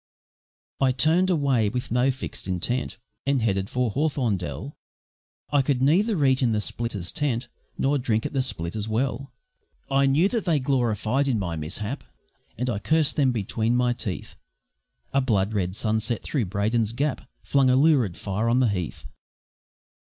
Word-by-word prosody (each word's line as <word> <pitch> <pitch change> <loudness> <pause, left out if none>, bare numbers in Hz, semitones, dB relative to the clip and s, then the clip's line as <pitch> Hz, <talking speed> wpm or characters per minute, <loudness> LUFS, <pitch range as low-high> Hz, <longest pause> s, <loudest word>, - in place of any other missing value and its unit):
I 130 -1 +3
turned 165 +8 +3
away 135 - +2
with 125 +2 -4
no 125 +3 +3
fixed 130 -6 -5
intent 95 +8 -2 0.3
And 140 -1 +3
headed 95 -2 0
for 125 -3 0
Hawthorndell; 130 - -2 0.8
I 145 -1 +4
could 135 -1 0
neither 175 +2 +3
eat 130 0 +3
in 120 -3 +2
the 105 - +1
splitters' 105 -4 -4
tent, 130 -5 -1 0.3
Nor 140 +1 +1
drink 110 -3 0
at - - -3
the 135 - +2
splitters' 105 -3 -3
well; 130 +4 -1 0.6
I 135 0 +4
knew 150 +7 +4
that 230 -3 -2
they 165 -3 +3
gloried 130 -1 0
in 125 -4 +1
my 90 -5 -2
mishap, 100 - -4 0.5
And 125 +3 -2
I 110 -5 -1
cursed 155 +8 +2
them 135 -3 +3
between 115 +1 -1
my 125 0 +2
teeth 105 -6 -5 0.8
A 140 - +3
blood 110 -5 +1
red 95 -3 -1
sunset 110 +1 0
through 135 -7 -1
Brayton's 105 +3 0
Gap 140 +3 -2
Flung 135 -2 +3
a 130 - +4
lurid 135 - +3
fire 105 +4 -1
on 120 - +3
the 125 -3 +3
heath. 90 -6 -4
125 Hz, 160 wpm, -25 LUFS, 105-140 Hz, 0.8 s, I